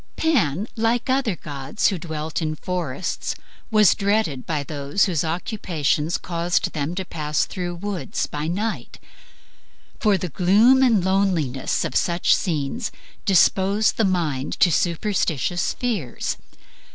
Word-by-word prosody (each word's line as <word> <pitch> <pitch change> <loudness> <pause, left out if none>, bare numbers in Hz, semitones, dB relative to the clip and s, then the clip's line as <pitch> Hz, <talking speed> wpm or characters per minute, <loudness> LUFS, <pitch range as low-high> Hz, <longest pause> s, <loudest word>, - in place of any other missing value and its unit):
Pan, 210 - +1
like 230 +2 +1
other 260 -7 +1
gods 145 +2 -1
who 190 -4 -3
dwelt 155 0 -4
in 155 -1 -1
forests, 180 -2 -3 0.3
was 215 -4 +6
dreaded 200 -10 0
by 155 -3 -1
those 145 +5 0
whose 170 -7 0
occupations 165 - -1
caused 170 0 -1
them 155 +2 -2
to 190 0 -3
pass 150 -3 -1
through 175 -2 -5
the 190 - -9
woods 205 +2 -2
by 150 +1 -4
night, 210 +6 -3 1.0
for 210 -3 +3
the 180 - -4
gloom 210 - +5
and 225 -8 +4
loneliness 180 -9 +1
of - - -4
such 170 0 +3
scenes 170 - -2 0.3
dispose 195 +2 +4
the 225 - 0
mind 160 -9 0
to 175 - +5
superstitious 175 -1 0
fears. 210 - -2
180 Hz, 130 wpm, -23 LUFS, 155-205 Hz, 1.0 s, was